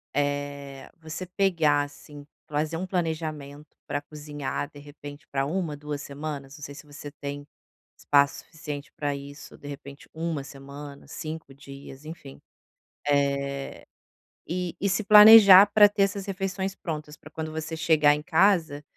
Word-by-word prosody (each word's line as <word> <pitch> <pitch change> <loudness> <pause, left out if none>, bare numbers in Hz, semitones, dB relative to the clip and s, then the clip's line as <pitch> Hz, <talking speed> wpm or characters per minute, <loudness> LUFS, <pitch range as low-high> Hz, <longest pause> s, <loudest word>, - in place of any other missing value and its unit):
eh, 145 -1 -3
você 160 +3 -6
pegar, 165 -6 +2
assim, 145 0 -12 0.2
fazer 155 +2 -2
um 185 - -4
planejamento 155 -5 -4
para 145 0 -2
cozinhar 145 -1 -5
de 145 - -13
repente 145 0 -12
para 135 -1 0
1, 160 -1 -2
2 145 0 -5
semanas, 140 -1 -7
não 145 - -12
sei 145 - -7
se - - -12
você 145 0 -10
tem 145 0 -7 0.5
espaço 140 -1 +2
suficiente 155 0 -8
para 145 -1 -2
isso, 140 0 -10
de 145 - -12
repente 140 -1 -10
1 160 -3 -3
semana, 140 +1 -11
5 155 -3 -7
dias, 140 0 -12
enfim. 155 -4 -10 0.7
Eh, 140 -1 -1 0.6
e 180 0 -3
e 200 - 0
se 190 +3 0
planejar 210 -2 +10
para 205 -1 +8
ter 205 -1 +1
essas 195 0 -2
refeições 195 0 -3
prontas 150 -2 -6
para - - -15
quando 160 -1 -5
você 160 +1 -5
chegar 155 -2 +4
em 150 - -3
casa, 160 -3 +2
150 Hz, 150 wpm, -26 LUFS, 145-165 Hz, 0.7 s, planejar